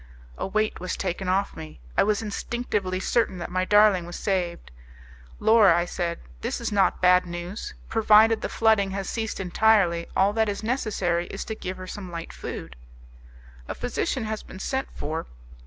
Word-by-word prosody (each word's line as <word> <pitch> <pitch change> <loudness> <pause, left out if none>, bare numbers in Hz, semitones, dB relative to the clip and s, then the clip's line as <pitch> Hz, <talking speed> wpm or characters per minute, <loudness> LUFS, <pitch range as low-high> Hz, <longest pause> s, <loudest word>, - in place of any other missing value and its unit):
A - - -3
weight 215 +2 0
was 185 - -3
taken 185 0 -2
off 195 +2 0
me; 155 - -9 0.2
I - - +4
was 210 +2 +1
instinctively 210 -3 -2
certain 200 -1 +1
that 175 0 -6
my 185 0 0
darling 205 -4 +5
was 175 - -7
saved. 180 - -2 0.7
"Laura," 215 -5 +6
I 175 - +1
said, 175 -1 -3 0.2
"this - - -3
is - - -3
not 195 -3 +2
bad 180 0 +5
news; 175 +4 -6
provided 220 0 +5
the - - -3
flooding 220 -3 +3
has 195 -2 -4
ceased 225 -2 -3
entirely, 185 -2 +3
all 195 +2 +4
that 220 -1 +1
is 205 +1 -4
necessary 200 -8 0
is 195 - -6
to 220 - -4
give 185 -3 -6
her 185 - -7
some 185 0 -7
light 170 -1 -7
food." - - -7 0.9
"A - - -4
physician - - -2
has 215 0 -3
been - - -11
sent 265 +7 -2
for. 160 +2 -4
195 Hz, 175 wpm, -25 LUFS, 175-215 Hz, 0.9 s, Laura